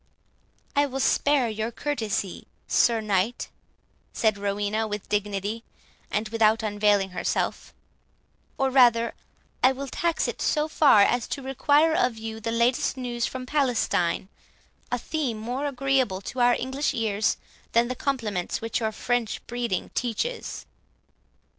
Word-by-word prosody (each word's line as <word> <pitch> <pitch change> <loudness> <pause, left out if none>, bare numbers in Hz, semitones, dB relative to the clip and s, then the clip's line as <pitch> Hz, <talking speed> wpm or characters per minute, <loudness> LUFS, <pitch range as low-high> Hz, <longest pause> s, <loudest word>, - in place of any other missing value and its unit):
"I 285 0 +3
will 270 0 -4
spare 280 -1 +3
your 220 0 -2
courtesy, 220 -8 -3 0.2
Sir 230 -2 +3
Knight," 210 +3 0 0.6
said 220 -2 +2
Rowena 205 +2 -1
with 210 -1 -5
dignity, 205 +2 -2 0.5
and 215 +1 -1
without 220 0 +3
unveiling 205 -2 +2
herself; 180 - -2 0.9
"or 270 -1 +1
rather 240 -3 +5 0.5
I 255 - +7
will 275 +1 -5
tax 335 +5 0
it - - -5
so 300 -1 +1
far 290 -9 +6
as 245 +2 +1
to 275 - -4
require 290 +4 +3
of 245 -8 +1
you 220 0 -6
the 225 +1 -3
latest 235 +3 +1
news 240 -2 -2
from 260 -1 -6
Palestine, 245 - +1 0.6
a 245 - +1
theme 255 -2 -2
more 250 +6 -3
agreeable 265 -7 0
to 255 - -6
our 245 0 +5
English 265 +3 -2
ears 215 -2 +1 0.4
than 235 +1 +4
the 255 - -2
compliments 225 -9 -2
which 225 +1 -2
your 220 -2 -1
French 235 +1 -2
breeding 235 -6 -3
teaches." 255 - -3
235 Hz, 135 wpm, -26 LUFS, 215-265 Hz, 0.9 s, I